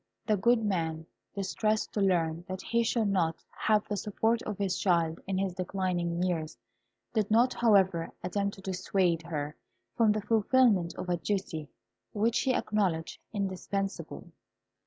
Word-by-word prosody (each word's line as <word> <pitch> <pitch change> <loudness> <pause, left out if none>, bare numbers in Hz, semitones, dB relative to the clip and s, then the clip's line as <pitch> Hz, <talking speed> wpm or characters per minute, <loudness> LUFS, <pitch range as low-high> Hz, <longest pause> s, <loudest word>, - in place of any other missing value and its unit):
The 215 - +3
good 225 +3 +3
man, 165 -5 -1 0.3
distressed 215 +2 -1
to 210 - 0
learn 170 -4 +1
that 185 0 -5
he 235 0 +1
should 230 -1 +1
not 165 -5 +1 0.2
have 215 -1 +1
the 205 - -2
support 220 +3 0
of 210 -2 -3
his 195 -3 0
child 170 -3 +2
in 190 -1 -1
his 190 -1 0
declining 180 -2 -1
years, 165 -4 -2 0.6
did 215 -3 +1
not, 235 +4 +4
however, 190 -7 +3
attempt 200 +2 -1
to 195 - -13
dissuade 185 -2 0
her 150 -2 -4 0.4
from 225 -2 +4
the 215 0 0
fulfilment 220 -4 +3
of - - -5
a 175 -1 +1
duty 170 -6 -3 0.4
which 225 +3 +2
he 260 -1 +1
acknowledged 185 -6 -1
indispensable. 195 -1 -3
195 Hz, 150 wpm, -30 LUFS, 175-215 Hz, 0.6 s, not